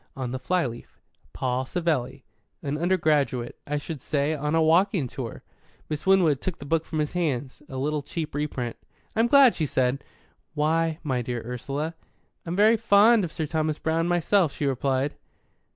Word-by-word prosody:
On 130 -2 -4
the 130 - -3
flyleaf, 130 -4 -2 0.3
'Paul 130 0 -2
Savelli.' 165 -7 -1 0.4
An 140 0 -2
undergraduate, 150 -7 +1
I 150 +1 -1
should 145 -1 -6
say, 145 +2 0
on 150 +1 -1
a 165 - +4
walking 170 0 +3
tour." 120 -2 -7 0.5
Miss 150 +3 -4
Winwood 175 -8 +4
took 185 -3 -3
the 140 - -10
book 165 +2 0
from 160 - -5
his 150 +1 -1
hands 140 -7 -2
a 130 - -6
little 150 +3 -1
cheap 155 +2 -5
reprint. 135 -5 -3 0.4
"I'm 225 +1 +3
glad," 270 -1 +7
she 155 - -1
said. 130 +1 0 0.5
"Why, 160 +1 +1
my 130 -5 0
dear 120 -1 -4
Ursula?" 140 +6 -4 0.5
"I'm 170 - -2
very 215 +3 +5
fond 220 0 +5
of 170 - -3
Sir 160 - -3
Thomas 155 0 -1
Browne, 165 +1 0
myself," 175 -1 +2
she 145 - -2
replied. 135 +1 0
150 Hz, 170 wpm, -26 LUFS, 135-170 Hz, 0.5 s, glad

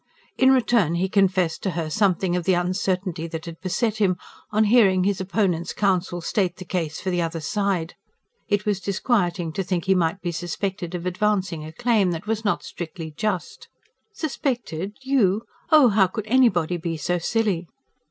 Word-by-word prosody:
In 260 - +5
return 230 - +3
he 180 +2 +1
confessed 185 -4 +2
to 195 - -1
her 165 -2 -1
something 190 -2 +2
of 180 -2 -2
the 185 -1 +3
uncertainty 180 -1 -1
that 160 0 -6
had 165 -1 -9
beset 215 +4 -1
him, 190 -4 +2 0.3
on 215 +1 +2
hearing 205 -4 +4
his 195 0 0
opponent's 185 -3 0
counsel 185 -3 0
state 185 0 0
the 185 - -9
case 165 -4 -3
for 185 - -2
the 175 -1 0
other 165 0 -2
side. 180 +1 -1 0.5
It 205 -1 0
was 205 -3 0
disquieting 185 -5 0
to 195 - -1
think 180 -1 -2
he 190 - +4
might 175 0 +1
be 175 -2 -3
suspected 180 +1 -4
of 175 0 -5
advancing 190 -3 0
a 155 - -8
claim 225 -2 +2
that 165 +2 -6
was 220 0 -2
not 205 - 0
strictly 165 -1 -7
just. 210 -3 -3 0.4
"Suspected?... 245 - -3
YOU? 225 -6 +2 0.3
Oh, 300 -6 +7
how 200 -2 +4
could 205 +3 -5
anybody 200 -8 +3
be 165 -1 -3
so 175 +3 -1
silly!" 190 -2 0
185 Hz, 175 wpm, -24 LUFS, 175-210 Hz, 0.5 s, Oh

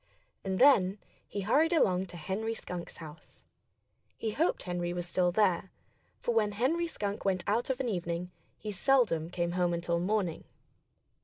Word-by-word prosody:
And 190 -1 -1
then 205 -8 +5 0.3
he 200 - -4
hurried 300 - +3
along 190 - +3
to 175 - -10
Henry 205 +8 -2
Skunk's 180 -5 -7
house. 160 -1 -12 0.7
He 220 - -2
hoped 315 +10 0
Henry 175 -1 -2
was 175 0 -3
still 180 0 +2
there; 185 -2 +2 0.5
for 240 - -1
when 210 -2 +2
Henry 300 +11 +1
Skunk 205 -9 -4
went 190 -2 +1
out 230 +5 0
of 265 -1 -1
an 260 - -1
evening 175 -3 -2 0.3
he 210 - -5
seldom 205 - +2
came 175 -1 -1
home 175 -1 +1
until 170 0 -1
morning. 185 -2 -1
190 Hz, 160 wpm, -31 LUFS, 175-225 Hz, 0.7 s, then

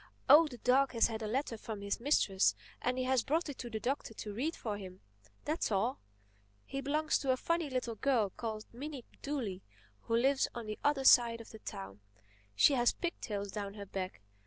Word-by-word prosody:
"Oh, 300 +4 +8
the 250 -5 -9
dog 260 +3 +3
has 230 - +4
had 220 -1 -4
a 215 - -2
letter 235 0 -2
from 215 -2 -6
his 200 +3 -2
mistress 220 -7 +3 0.3
and 250 +1 0
he 255 - 0
has 260 -1 +2
brought 315 +5 0
it 280 - -7
to 240 - -5
the 220 -1 -3
Doctor 245 -1 -2
to 210 -1 -6
read 290 +10 -1
for 215 -3 -4
him. 185 -1 -10 0.4
That's 310 -5 -1
all. 220 +6 +1 0.7
He 275 - -4
belongs 305 +3 +1
to 275 - -3
a 255 - +4
funny 335 +1 0
little 255 -3 -2
girl 225 -3 +1
called 220 0 -5
Minnie 275 0 -7 0.2
Dooley, 235 -10 -3 0.4
who 230 - -1
lives 270 +3 +3
on 235 -1 -5
the 215 0 -5
other 290 -2 +2
side 235 -3 +6
of 230 - -11
the 220 - -10
town. 95 - -7 0.6
She 285 - +6
has 240 -2 +3
pigtails 205 - -4
down 200 -1 -5
her 200 -1 -7
back. 185 - -5
240 Hz, 205 wpm, -33 LUFS, 210-275 Hz, 0.7 s, Oh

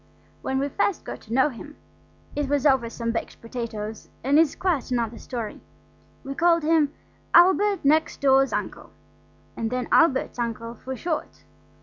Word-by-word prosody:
When 265 - -2
we 275 +1 0
first 395 +4 -1
got - - -7
to 225 - -8
know 265 +3 +4
him 290 +4 -10 0.6
(it 290 -2 -1
was 285 -1 +1
over 265 -5 +3
some 230 0 -3
baked 230 - -5
potatoes, 225 -2 -6
and 280 +4 +4
is 325 -3 +3
quite 345 -10 -1
another 235 -2 -1
story) 230 -4 -6 0.6
we 275 -1 -5
called 335 +2 +3
him 310 -2 +3 0.4
Albert 380 +1 +5
next 310 +3 +2
door's 270 -1 +4
Uncle, - - -4 0.7
and 225 -1 -2
then 250 0 -2
Albert's 275 -6 +3
uncle 230 0 -3
for 260 +3 -7
short. 320 +4 -4
270 Hz, 155 wpm, -25 LUFS, 235-310 Hz, 0.7 s, Albert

